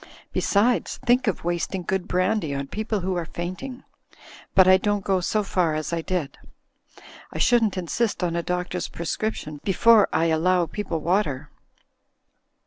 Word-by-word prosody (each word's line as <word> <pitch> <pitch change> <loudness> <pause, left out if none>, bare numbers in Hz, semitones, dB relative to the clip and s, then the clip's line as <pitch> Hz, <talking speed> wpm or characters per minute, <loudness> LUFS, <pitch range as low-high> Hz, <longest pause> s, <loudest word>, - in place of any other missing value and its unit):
Besides, 225 +5 +1
think 245 +1 +3
of 210 - -1
wasting 175 +2 -2
good 190 +1 -2
brandy 185 -4 0
on 140 0 -3
people 215 -1 -2
who 185 +1 -2
are 170 - -2
fainting! 185 +11 -6 0.7
But 190 -1 +7
I 185 0 +7
don't 205 +1 -1
go 190 -1 +1
so 210 +4 0
far 180 -5 0
as 155 +2 -3
I 165 - 0
did; 160 -5 -3 0.9
I - - -7
shouldn't 225 -5 +3
insist 190 +4 -1
on 170 -1 0
a 170 - 0
doctor's 180 0 -3
prescription 165 -3 -4
before 220 +2 +5
I 165 - +2
allow 175 +2 +2
people 170 -3 -4
water. 170 -6 -1
185 Hz, 150 wpm, -24 LUFS, 170-210 Hz, 0.9 s, But